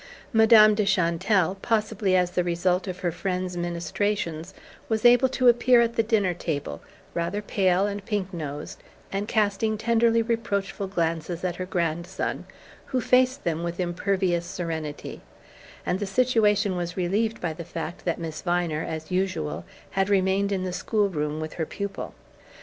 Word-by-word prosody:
Madame 220 Hz, -1 st, +7 dB
de 210 Hz, 0 st, +1 dB
Chantelle 185 Hz, 0 st, +2 dB
possibly 215 Hz, -4 st, +1 dB
as 180 Hz, -1 st, +2 dB
the 180 Hz, -, +1 dB
result 180 Hz, +2 st, 0 dB
of 180 Hz, -1 st, -5 dB
her 175 Hz, -2 st, 0 dB
friend's 180 Hz, +1 st, -3 dB
ministrations 175 Hz, 0 st, -2 dB, 0.4 s
was 220 Hz, 0 st, 0 dB
able 245 Hz, +2 st, +6 dB
to 255 Hz, -1 st, +1 dB
appear 240 Hz, +1 st, +6 dB
at 235 Hz, 0 st, +2 dB
the -, -, +4 dB
dinner 210 Hz, -5 st, +1 dB
table, 145 Hz, -, -4 dB, 0.3 s
rather 170 Hz, +4 st, -1 dB
pale 190 Hz, -2 st, +1 dB
and 205 Hz, -1 st, -3 dB
pink 200 Hz, -3 st, -3 dB
nosed, 150 Hz, -3 st, -6 dB, 0.3 s
and 200 Hz, +1 st, -2 dB
casting 215 Hz, 0 st, +1 dB
tenderly 230 Hz, +1 st, +3 dB
reproachful 200 Hz, -4 st, -2 dB
glances 165 Hz, -1 st, -2 dB
at 175 Hz, -2 st, -2 dB
her 185 Hz, -, -4 dB
grandson, 170 Hz, +1 st, -2 dB, 0.4 s
who 260 Hz, -, 0 dB
faced 255 Hz, +2 st, +3 dB
them 165 Hz, -1 st, -1 dB
with 170 Hz, +1 st, -4 dB
impervious 180 Hz, 0 st, 0 dB
serenity; 160 Hz, -4 st, -5 dB, 0.6 s
and 180 Hz, -, 0 dB
the 205 Hz, -, -2 dB
situation 210 Hz, -3 st, +2 dB
was 175 Hz, 0 st, -4 dB
relieved 210 Hz, +5 st, 0 dB
by 165 Hz, -3 st, -2 dB
the 170 Hz, -, -7 dB
fact 170 Hz, +1 st, -6 dB
that 170 Hz, -, -1 dB
Miss 160 Hz, -2 st, -5 dB
Viner, 175 Hz, -3 st, 0 dB
as 160 Hz, +2 st, -6 dB
usual, 180 Hz, -5 st, -1 dB, 0.3 s
had 195 Hz, +1 st, 0 dB
remained 195 Hz, 0 st, +2 dB
in 190 Hz, -2 st, -1 dB
the 185 Hz, -1 st, -3 dB
school 205 Hz, +2 st, 0 dB
room 150 Hz, -3 st, -2 dB
with 155 Hz, 0 st, -5 dB
her 160 Hz, -, -2 dB
pupil. 200 Hz, -1 st, -5 dB
185 Hz, 160 wpm, -25 LUFS, 170-210 Hz, 0.6 s, Madame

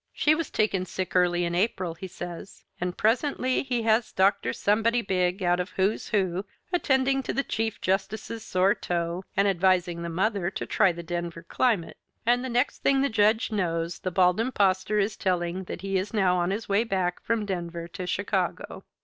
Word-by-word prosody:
"She 305 Hz, -, +3 dB
was 320 Hz, -1 st, -2 dB
taken 195 Hz, -4 st, 0 dB
sick 185 Hz, 0 st, -4 dB
early 175 Hz, -1 st, +3 dB
in 170 Hz, -, -2 dB
April," 185 Hz, -2 st, 0 dB
he 190 Hz, +3 st, -8 dB
says, 175 Hz, +1 st, -8 dB, 0.2 s
and 180 Hz, 0 st, -3 dB
presently 255 Hz, +3 st, +1 dB
he 245 Hz, -4 st, -2 dB
has 220 Hz, +1 st, +2 dB
Dr. 190 Hz, -, +2 dB
Somebody 225 Hz, -, +1 dB
Big 185 Hz, 0 st, 0 dB
out 175 Hz, 0 st, +2 dB
of 180 Hz, +2 st, -2 dB
"Who's 195 Hz, +3 st, +1 dB
Who" 190 Hz, -2 st, 0 dB, 0.3 s
attending 270 Hz, -5 st, +2 dB
to -, -, -3 dB
the 275 Hz, -, 0 dB
Chief 225 Hz, -3 st, -2 dB
Justice's 210 Hz, +4 st, -2 dB
sore 185 Hz, +1 st, +2 dB
toe 175 Hz, 0 st, -3 dB
and 200 Hz, +1 st, +4 dB
advising 180 Hz, -2 st, +2 dB
the 170 Hz, -, -4 dB
mother 190 Hz, +1 st, 0 dB
to -, -, -5 dB
try 195 Hz, -4 st, +3 dB
the 170 Hz, 0 st, -7 dB
Denver 170 Hz, -1 st, -4 dB
climate. 220 Hz, -10 st, 0 dB, 0.3 s
And 245 Hz, +2 st, +3 dB
the 260 Hz, -, -3 dB
next 245 Hz, +3 st, 0 dB
thing 270 Hz, -1 st, +3 dB
the 280 Hz, -, +2 dB
Judge 220 Hz, +1 st, +2 dB
knows 170 Hz, -4 st, -1 dB
the 185 Hz, -, -2 dB
Bald 180 Hz, +1 st, +3 dB
Impostor 205 Hz, -4 st, +1 dB
is 210 Hz, +1 st, +1 dB
telling 180 Hz, -1 st, -1 dB
that 175 Hz, -, -6 dB
he 195 Hz, -1 st, 0 dB
is 200 Hz, +4 st, -5 dB
now 190 Hz, -3 st, +3 dB
on 175 Hz, 0 st, +1 dB
his 210 Hz, +4 st, -3 dB
way 200 Hz, +3 st, +2 dB
back 185 Hz, -5 st, -1 dB
from 230 Hz, -2 st, -1 dB
Denver 170 Hz, -3 st, -4 dB
to 180 Hz, +2 st, -6 dB
Chicago. 200 Hz, +3 st, -2 dB
190 Hz, 190 wpm, -26 LUFS, 175-220 Hz, 0.3 s, and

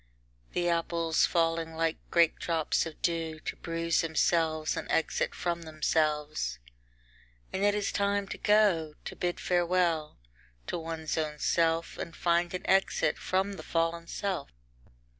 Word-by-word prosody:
The 175 Hz, 0 st, 0 dB
apples 170 Hz, -1 st, +2 dB
falling 165 Hz, -1 st, 0 dB
like 165 Hz, 0 st, 0 dB
great 170 Hz, -2 st, +4 dB
drops 165 Hz, -1 st, 0 dB
of 160 Hz, -, -10 dB
dew 165 Hz, -2 st, -1 dB
to -, -, -4 dB
bruise 165 Hz, -1 st, 0 dB
themselves 160 Hz, -1 st, +1 dB
an -, -, -5 dB
exit 165 Hz, -, 0 dB
from 170 Hz, -1 st, -2 dB
themselves. 155 Hz, -, 0 dB, 1.0 s
And 195 Hz, -, -1 dB
it 205 Hz, 0 st, +4 dB
is 205 Hz, -1 st, -1 dB
time 200 Hz, 0 st, 0 dB
to -, -, -5 dB
go, 195 Hz, -8 st, +3 dB
to -, -, -6 dB
bid 175 Hz, -1 st, -2 dB
farewell 175 Hz, -3 st, +1 dB, 0.5 s
to -, -, -3 dB
one's 160 Hz, -1 st, -3 dB
own 150 Hz, -1 st, -2 dB
self, 165 Hz, +1 st, +1 dB
and 165 Hz, -, -5 dB
find 170 Hz, 0 st, +1 dB
an 180 Hz, -, -5 dB
exit 195 Hz, 0 st, +2 dB
from 190 Hz, +2 st, 0 dB
the -, -, -7 dB
fallen 165 Hz, 0 st, -1 dB
self. 190 Hz, -6 st, -3 dB
165 Hz, 140 wpm, -30 LUFS, 160-175 Hz, 1.0 s, great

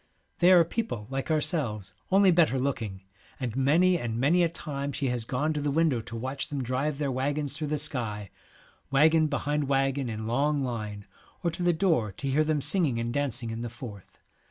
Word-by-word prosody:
They 180 Hz, +1 st, +6 dB
are 175 Hz, -2 st, +7 dB
people 170 Hz, -, -3 dB
like 135 Hz, 0 st, -2 dB
Happy 160 Hz, -, +1 dB
and -, -, +3 dB
ourselves, 110 Hz, -, -1 dB, 0.2 s
only 195 Hz, 0 st, +6 dB
better 165 Hz, -6 st, +3 dB
looking, 115 Hz, -8 st, -3 dB, 0.4 s
and 125 Hz, -4 st, -3 dB
many 155 Hz, +8 st, +4 dB
Theologians, 120 Hz, -7 st, -3 dB
and 115 Hz, -, -3 dB
many 155 Hz, +8 st, +3 dB
a 170 Hz, -, +3 dB
time 145 Hz, -4 st, -4 dB
she 140 Hz, -2 st, -1 dB
has 120 Hz, -2 st, -2 dB
gone 145 Hz, +6 st, -1 dB
to 150 Hz, -, -2 dB
the 145 Hz, -, 0 dB
window 145 Hz, -5 st, +2 dB
to 115 Hz, -, -9 dB
watch 130 Hz, +4 st, -3 dB
them 140 Hz, -3 st, -3 dB
drive 135 Hz, +4 st, -1 dB
their 140 Hz, -2 st, -1 dB
waggons 140 Hz, +2 st, -1 dB
through 155 Hz, 0 st, -4 dB
the 150 Hz, +1 st, -1 dB
sky, 115 Hz, -, -3 dB, 0.6 s
waggon 155 Hz, +3 st, +4 dB
behind 145 Hz, 0 st, -1 dB
waggon 135 Hz, -1 st, +1 dB
in 110 Hz, -1 st, -4 dB
long 140 Hz, +6 st, +1 dB
line, 105 Hz, -5 st, -4 dB, 0.4 s
or 170 Hz, -, +1 dB
to 170 Hz, -, -7 dB
the 175 Hz, 0 st, +3 dB
door 160 Hz, -, +1 dB
to 140 Hz, -, -5 dB
hear 140 Hz, +3 st, +3 dB
them 155 Hz, -1 st, 0 dB
singing 155 Hz, -7 st, +2 dB
and 115 Hz, 0 st, -2 dB
dancing 130 Hz, -5 st, -1 dB
in 115 Hz, +1 st, -5 dB
the 120 Hz, -, -4 dB
Forth. 110 Hz, -5 st, -10 dB
140 Hz, 210 wpm, -28 LUFS, 120-155 Hz, 0.6 s, are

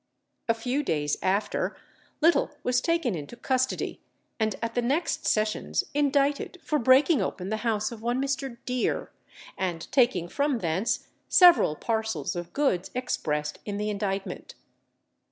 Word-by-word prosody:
A 230 Hz, -, +4 dB
few 250 Hz, +5 st, -1 dB
days 150 Hz, -, 0 dB
after, 195 Hz, +3 st, 0 dB, 0.4 s
Little 330 Hz, +2 st, +4 dB
was 250 Hz, 0 st, +2 dB
taken 335 Hz, -, +1 dB
into 155 Hz, +6 st, -6 dB
custody, 260 Hz, +1 st, -1 dB, 0.4 s
and 220 Hz, -2 st, +1 dB
at 230 Hz, 0 st, -3 dB
the 245 Hz, -, +1 dB
next 310 Hz, +5 st, 0 dB
sessions 215 Hz, 0 st, +1 dB
indicted 285 Hz, +3 st, +1 dB
for 300 Hz, -, 0 dB
breaking 260 Hz, +6 st, +5 dB
open 185 Hz, 0 st, -3 dB
the 220 Hz, -, -1 dB
house 220 Hz, -1 st, -1 dB
of 230 Hz, -2 st, -9 dB
one 240 Hz, +2 st, 0 dB
Mr. 270 Hz, -2 st, -2 dB
Deer, 250 Hz, -1 st, -1 dB, 0.5 s
and 175 Hz, -3 st, -2 dB
taking 240 Hz, -10 st, +3 dB
from 280 Hz, +6 st, 0 dB
thence 185 Hz, +2 st, -1 dB, 0.2 s
several 350 Hz, -, +7 dB
parcels 220 Hz, -6 st, -2 dB
of 175 Hz, 0 st, -5 dB
goods 230 Hz, -11 st, 0 dB
expressed 150 Hz, -12 st, -2 dB
in 205 Hz, -1 st, -4 dB
the 210 Hz, +1 st, -1 dB
indictment. 200 Hz, -1 st, -4 dB
235 Hz, 140 wpm, -27 LUFS, 195-270 Hz, 0.5 s, several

